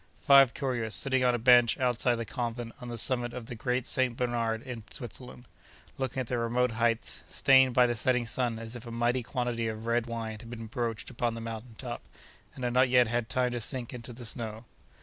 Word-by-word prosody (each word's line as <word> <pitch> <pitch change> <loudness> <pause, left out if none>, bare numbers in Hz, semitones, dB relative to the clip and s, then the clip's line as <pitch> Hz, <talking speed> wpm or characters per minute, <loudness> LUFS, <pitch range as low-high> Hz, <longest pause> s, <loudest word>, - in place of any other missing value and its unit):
Five 135 -3 +7
couriers, 120 -5 -1
sitting 130 -2 +2
on 125 -1 +3
a - - 0
bench 120 0 +5
outside 125 -2 +2
the 115 0 -4
convent 120 0 -4
on 125 - -7
the 120 -1 -5
summit 120 +1 0
of 125 -2 -6
the 125 - -7
Great 125 +1 -1
St. 130 -2 +1
Bernard 115 -2 -1
in 125 -4 -7
Switzerland, 125 +2 -7 0.5
looking 130 0 -1
at - - -3
the 120 +1 -2
remote 120 +1 +1
heights, 115 0 0
stained 130 -2 +4
by 125 - +6
the 120 0 0
setting 125 +2 +1
sun 120 -1 -1
as 115 +1 -5
if 120 0 -8
a - - -6
mighty 120 +2 +1
quantity 120 -1 -2
of 110 0 -5
red 115 0 +1
wine 115 -2 -4
had 115 - -11
been 115 -1 -7
broached 115 -1 -3
upon 115 0 -1
the - - -5
mountain 115 0 -7
top, 120 -2 -6 0.5
and 130 - -8
had 120 -1 0
not 130 +1 +4
yet 125 0 +5
had 120 0 -2
time 125 -1 +1
to 120 -1 -3
sink 125 +2 -3
into 120 -1 -7
the 120 0 -9
snow. 115 0 -4
120 Hz, 220 wpm, -29 LUFS, 115-125 Hz, 0.5 s, Five